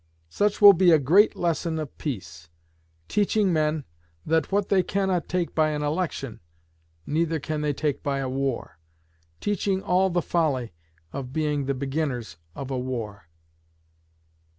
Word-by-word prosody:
Such 205 - 0
will 205 -1 +11
be 180 0 +4
a 160 - +7
great 175 +10 +4
lesson 170 -1 -1
of 155 -3 -5
peace: 85 - -6 0.6
teaching 205 -2 +2
men 155 -1 +1 0.4
that 160 +2 +1
what 200 0 +1
they 195 -2 +4
cannot 190 -2 -1
take 180 -1 -1
by 155 -1 +3
an 150 -1 -2
election, 145 -6 -2 0.7
neither 160 +1 0
can 150 +1 -3
they 150 -1 +1
take 145 0 -2
by 140 -1 -1
a 135 -1 -2
war; 130 -10 -3 0.6
teaching 195 -1 -1
all 185 +1 +2
the 175 -1 0
folly 140 - 0 0.4
of 130 -2 -5
being 150 -2 0
the 140 - 0
beginners 135 - -3 0.2
of 135 -1 -6
a 130 - -1
war. 110 -8 -5
155 Hz, 150 wpm, -25 LUFS, 135-180 Hz, 0.7 s, will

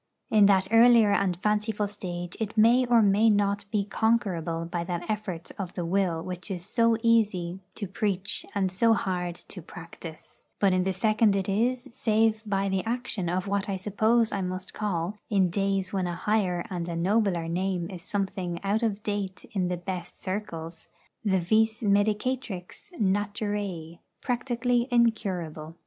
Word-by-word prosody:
In 210 -2 +6
that 190 -1 +4
earlier 230 -2 +6
and 190 -3 +1
fanciful 210 +1 0
stage 175 -4 -6
it 220 0 -4
may 240 +4 +5
or 235 -2 +5
may 205 +3 +4
not 205 -1 +1
be 205 -2 0
conquerable 190 -7 0
by 170 0 -3
that 175 0 -4
effort 205 -6 -4
of 185 -3 -4
the 175 - -3
will 175 -2 0
which 180 +2 -6
is 180 -2 -4
so 230 +1 +2
easy 200 -6 +2 0.2
to 205 - -4
preach 195 0 -2
and 190 -2 +1
so 225 +4 +4
hard 180 -3 -2
to 180 - -8
practise; 165 -1 -11 0.2
but 195 -2 +4
in 185 0 +1
the 190 - +1
second 215 +2 +2
it 195 -1 -1
is, 245 +6 0
save 220 -2 +2
by 195 -1 0
the 190 -1 0
action 230 -6 -2
of 180 +1 -1
what 200 0 -1
I 195 - 0
suppose 215 +4 +2
I 200 - -1
must 185 0 -4
call 200 -1 -2
in 190 -5 +2
days 195 0 0
when 190 -2 0
a 175 - -3
higher 185 -2 0
and 175 -2 -3
a 170 - -3
nobler 185 -1 +1
Name 180 0 -1
is 180 -2 -8
something 190 -3 -3
out 205 +3 +1
of 215 -3 -1
date 205 -3 -3
in 185 -3 0
the 180 0 -2
'best 175 0 -6
circles' 175 -4 -5 0.3
the 195 -3 +2
vis 220 +5 +2
medicatrix 210 - -1
'Naturæ,' 205 -4 -2 0.2
practically 245 -1 0
incurable. 185 - 0
200 Hz, 165 wpm, -27 LUFS, 180-215 Hz, 0.3 s, In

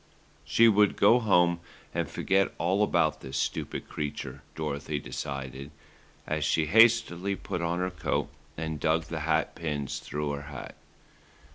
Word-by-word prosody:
She 115 - +5
would 105 -2 +4
go 115 +5 +5
home 90 -6 +3 0.3
and - - -1
forget 95 0 +1
all 95 +4 +1
about 80 -7 +2
the 65 - -8
stupid 65 - -2
creature, 75 -1 -5
Dorothy 75 -1 -3
decided, 70 +1 -5 0.6
as 75 0 -1
she 80 +2 +2
hastily 100 -1 +4
put 90 -2 -4
on 85 0 -1
her 90 +1 -1
coat 75 -3 -1 0.3
and 80 -1 -3
dug 80 +2 +2
the - - -5
hat - - 0
pins 75 -4 -3
through 75 0 -3
her 70 0 -4
hat. 70 - -8
80 Hz, 145 wpm, -28 LUFS, 75-95 Hz, 0.6 s, She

